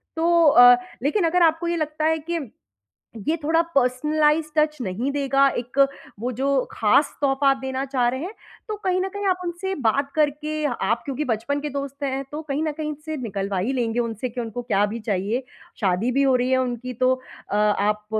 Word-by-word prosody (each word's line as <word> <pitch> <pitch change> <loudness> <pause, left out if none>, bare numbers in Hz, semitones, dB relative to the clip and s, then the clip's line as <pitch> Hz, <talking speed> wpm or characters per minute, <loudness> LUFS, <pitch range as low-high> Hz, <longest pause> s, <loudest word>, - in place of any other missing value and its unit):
तो 335 +1 +3
अ, 245 -3 +8 0.3
लेकिन 340 +7 +1
अगर 355 +2 +2
आपको 325 +1 +2
ये 340 - 0
लगता 310 0 -2
है 320 0 +3
कि 320 -9 -3 0.8
ये 315 - +3
थोड़ा 325 +2 +3
पर्सनलाइज़्ड 300 +4 +2
टच 305 0 +1
नहीं 230 +6 -2
देगा, 275 -1 +3
एक 255 +3 +2 0.3
वो 245 +3 -2
जो 275 - +1 0.2
ख़ास 225 +7 +2
तोहफ़ा 275 0 +3
आप 270 - +2
देना 265 0 -2
चाह 255 -3 +1
रहे 260 +3 -4
हैं, 390 +5 -6 0.3
तो 430 - -3
कहीं 370 0 +2
न 385 - -2
कहीं 405 +1 -5
आप 365 -1 +1
उनसे 350 +3 -3
बात 280 +5 +1
करके, 305 0 0
आप 235 -4 0
क्योंकि 280 +2 -3
बचपन 240 +5 -1
के 300 - -3
दोस्त 280 0 -5
हैं, 270 0 -1
तो 300 +1 -4
कहीं 300 -1 -2
न 310 - 0
कहीं 305 0 -4
से 315 -1 -4
निकलवा 195 -2 -3
ही 245 +9 -1
लेंगे 240 -2 -1
उनसे 230 +1 -2
कि 240 +1 -4
उनको 230 +1 -5
क्या 205 -4 +1
भी 235 - -4
चाहिए। 205 +7 -1 0.4
शादी 200 +5 +1
भी 275 +2 +2
हो 265 -2 +4
रही 250 +1 +1
है 260 - +4
उनकी, 250 0 -4
तो 255 +2 +2 0.4
अ, - - -2
आप 210 0 +1
275 Hz, 205 wpm, -23 LUFS, 240-310 Hz, 0.8 s, अ